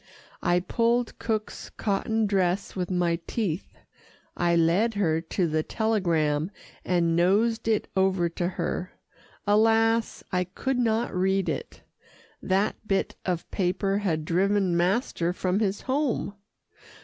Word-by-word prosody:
I 175 0 +2
pulled 235 +5 0
cook's 215 -2 -3
cotton 220 +2 -1
dress 195 -1 0
with 180 -2 -2
my 175 -2 +1
teeth. 195 -7 -3 0.6
I 175 -1 +2
led 175 +7 +3
her 165 -5 +1
to 175 +2 -1
the 155 0 0
telegram, 165 -7 0 0.3
and 170 -2 +1
nosed 220 +7 +2
it 220 -2 +1
over 190 -2 +2
to 175 +1 -2
her. 180 0 -3 0.5
Alas! 225 +2 +3
I 180 -1 +1
could 250 +8 -2
not 230 -1 +1
read 190 +1 +1
it. - - -5 0.6
That 195 +2 +1
bit 195 -1 0
of 175 -2 -2
paper 195 +2 0
had 160 -7 -1
driven 190 +1 +2
master 175 -1 +1
from 185 +1 0
his 205 -2 0
home. 270 -6 -1
190 Hz, 125 wpm, -26 LUFS, 175-220 Hz, 0.6 s, led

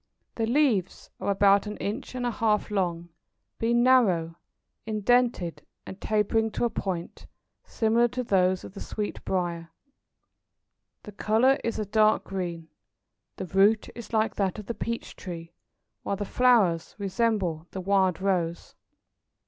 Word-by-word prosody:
The 225 -1 -1
leaves 240 - +1
are - - -2
about 200 +1 +4
an 210 - -5
inch 235 +5 -5
and 250 -1 -2
a 240 - 0
half 215 -2 0
long, 175 -4 -1 0.5
being 235 +1 +2
narrow, 190 -11 +3 0.5
indented, 220 -4 +1 0.2
and 190 - -10
tapering 220 +1 +1
to - - 0
a 235 - 0
point, 175 -3 -5 0.4
similar 230 +1 +2
to 250 +1 -4
those 185 -4 +2
of - - -10
the 200 - -9
sweetbriar. 175 -5 -3 1.3
The 210 - -9
colour 225 +7 +2
is 230 - -2
a 215 - -2
dark 215 +1 +3
green. 170 -4 -5 0.7
The - - -5
root 195 +5 +3
is 235 - -10
like 220 -1 +1
that 195 -1 0
of 210 - -7
the 235 - -3
peach 230 0 -5
tree, 170 -3 -8 0.5
while 200 - -2
the 205 +1 -4
flowers 210 -10 +2
resemble 195 -5 -1
the 190 - -6
wild 190 -2 +2
rose. 180 -3 -1
205 Hz, 140 wpm, -27 LUFS, 185-230 Hz, 1.3 s, about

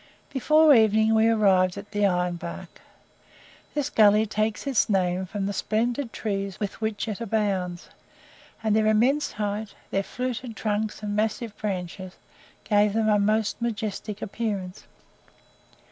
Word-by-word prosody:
Before 305 +3 +5
evening 220 -1 +4
we 220 0 +4
arrived 195 -5 +3
at 200 +1 -9
the 205 -1 +2
Iron 180 -1 0
Bark. 170 0 -8 0.9
This 290 -1 -1
gully 215 0 +5
takes 215 +2 -2
its 270 -6 +1
name 185 -2 +1
from 195 +1 -3
the 200 - -2
splendid 235 +5 -1
trees 195 -2 -3
with 205 +1 -4
which 220 0 -2
it 215 0 -4
abounds; 195 -5 -1 0.8
and 215 -1 +2
their 215 0 +3
immense 245 +7 +2
height, 210 0 -3 0.2
their 195 - +1
fluted 250 +1 -5
trunks 215 0 -2
and 205 -1 -2
massive 215 +1 -1
branches 185 -2 -5 0.5
gave 205 -1 +3
them 220 0 +1
a 210 -1 +4
most 215 +2 0
majestic 210 -2 -3
appearance. 200 -4 -4
215 Hz, 140 wpm, -25 LUFS, 200-225 Hz, 0.9 s, Before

